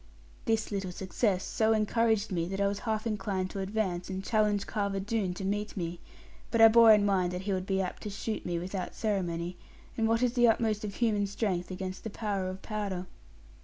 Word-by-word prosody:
This 225 -1 0
little 195 -2 -2
success 190 +1 0
so 220 0 +2
encouraged 220 0 +1
me, 170 -2 0
that 195 +2 -4
I 200 - +3
was 200 0 0
half 220 0 -1
inclined 190 -4 -2
to 195 - -5
advance, 190 -3 -2
and 190 0 -4
challenge 210 -2 +1
Carver 200 -2 -1
Doone 195 -2 -1
to 190 - -5
meet 205 +2 -2
me; 170 -1 -3 0.5
but 230 - 0
I 225 0 +10
bore 230 0 +8
in 210 -1 +6
mind 185 -3 +2
that 180 +1 -4
he 200 0 -1
would 185 0 -2
be 195 -1 +1
apt 180 - -5
to 210 - -5
shoot 215 +2 -4
me 175 -1 -2
without 185 +2 -4
ceremony; 175 -5 -2 0.4
and 225 -1 +1
what 230 +2 +2
is 245 -1 +2
the 240 -2 +5
utmost 220 -2 +2
of 205 -2 -4
human 210 -4 +1
strength 195 -3 -2
against 185 0 -5
the 225 - -4
power 200 -3 -2
of 185 +1 -8
powder? 200 -4 -3
200 Hz, 210 wpm, -30 LUFS, 185-220 Hz, 0.5 s, I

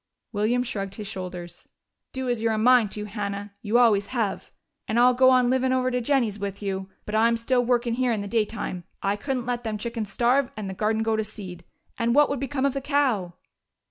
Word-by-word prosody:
William 230 +3 +1
shrugged 200 -6 -4
his 210 - -6
shoulders. 180 -3 -7 0.4
"Do 260 -1 -4
as 240 -2 0
you're 225 -1 +1
a - - -1
mind 240 -1 +5
to, 210 0 -4
Hannah 200 -1 -5
you 225 +1 +1
always 210 -5 +4
have. 225 -5 -2 0.4
And 225 +2 +1
I'll 250 +1 +6
go 260 +1 +5
on 255 -1 +4
livin' 260 0 +2
over 255 0 +1
to 250 0 0
Jennie's 235 -5 +1
with 200 -1 -4
you. 195 -1 -4 0.2
But 210 - -6
I'm 230 +2 +3
still 245 +2 +1
workin' 240 -1 +1
here 250 0 +1
in 215 -3 -1
the 200 - -5
daytime. 210 -4 -2 0.2
I 200 +1 +1
couldn't 255 +2 -3
let 245 -1 -2
them 220 -2 -2
chickens 225 -2 -4
starve 250 +4 +2
and 210 -2 -4
the 190 - -4
garden 220 +3 0
go 225 0 +1
to 220 - 0
seed. 180 -5 -9 0.3
And 235 +1 +1
what 295 0 +5
would 280 - -1
become 270 0 -1
of 280 - +1
the 275 - -3
cow?" 260 - 0
230 Hz, 220 wpm, -25 LUFS, 205-250 Hz, 0.4 s, I'll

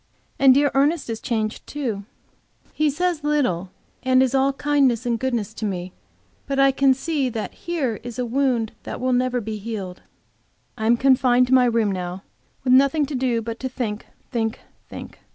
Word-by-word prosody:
And 270 -1 +7
dear 285 0 +3
Ernest 280 -1 +1
is 225 - -4
changed, 220 -4 -3
too. 230 -9 -4 0.7
He 305 0 +2
says 335 +1 -1
little, 250 - 0 0.3
and 260 0 +4
is 260 -1 0
all 270 0 +3
kindness 275 -4 +1
and 235 -1 0
goodness 235 -4 -2
to 220 - -8
me, 185 -3 -3 0.5
but 275 0 -2
I 275 0 +6
can 270 0 +3
see 280 -1 -1 0.2
here 285 -10 -3
is 240 -1 -8
a 250 - -1
wound 245 -3 0
that - - -6
will 255 0 0
never 250 0 +1
be 220 -1 -5
healed. 200 -4 -6 0.7
I 220 -2 -2
am 235 +1 +4
confined 255 -1 +4
to - - +2
my 255 -1 +6
room 230 -4 +2
now 180 0 -5 0.4
with 255 -1 +3
nothing 275 +3 +4
do 255 -5 -1
but 230 +1 -5
to 260 - -3
think, 225 -5 -4 0.2
think, 225 -3 -2 0.3
think. - - -9
250 Hz, 175 wpm, -22 LUFS, 225-275 Hz, 0.7 s, And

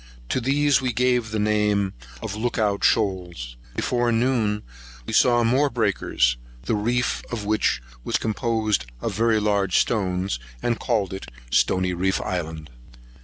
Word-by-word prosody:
To 130 - 0
these 140 +2 +3
we 130 -1 0
gave 125 -1 +2
the 110 - -2
name 105 -2 +1 0.3
of - - -3
Look 120 +3 -2
out 105 -3 +1
Shoals. 90 - 0 0.2
Before 120 -1 +1
noon 115 -3 +1 0.4
we - - -5
saw 120 -1 +5
more 130 +5 +3
breakers, 100 - +1 0.3
the 70 - -1
reef 120 +4 0
of 110 -4 -4
which 105 - +1 0.2
was - - 0
composed 110 - 0
of - - -3
very 115 0 +2
large 100 -3 +1
stones, 95 - 0 0.2
and 120 -1 0
called 105 -6 0
it 95 - -7 0.2
Stony 90 +5 +2
reef 95 +2 0
Island. 80 -4 -4
105 Hz, 145 wpm, -24 LUFS, 95-120 Hz, 0.4 s, saw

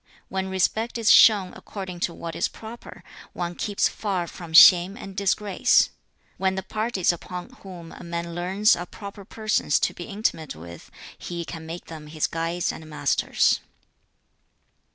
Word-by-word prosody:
When 190 0 -2
respect 215 +5 0
is 225 -2 +4
shown 200 -5 +6
according 190 -3 -8
to 170 - -1
what 165 -1 -6
is - - +1
proper, 225 +2 -11 0.3
one 175 0 -3
keeps 205 +3 0
far 190 -5 -2
from 170 0 -10
shame 180 +4 +8
and 195 -6 -9
disgrace. 200 +3 +2 0.5
When 190 0 0
the 190 - -3
parties 215 -2 0
upon 180 +1 -7
whom 175 -4 -10
a - - -11
man 170 0 -4
leans 190 +5 +2
are 175 +1 -6
proper 200 +1 -10
persons 215 -8 0
to - - +1
be 175 - -8
intimate 195 -7 -2
with, 85 +1 -11 0.3
he 170 -1 -6
can 160 -1 -8
make 170 +2 -7
them 155 -2 -10
his 155 0 -1
guides 165 +2 -2
and 160 -1 -10
masters.' 145 -2 +1
180 Hz, 155 wpm, -24 LUFS, 170-200 Hz, 0.5 s, shame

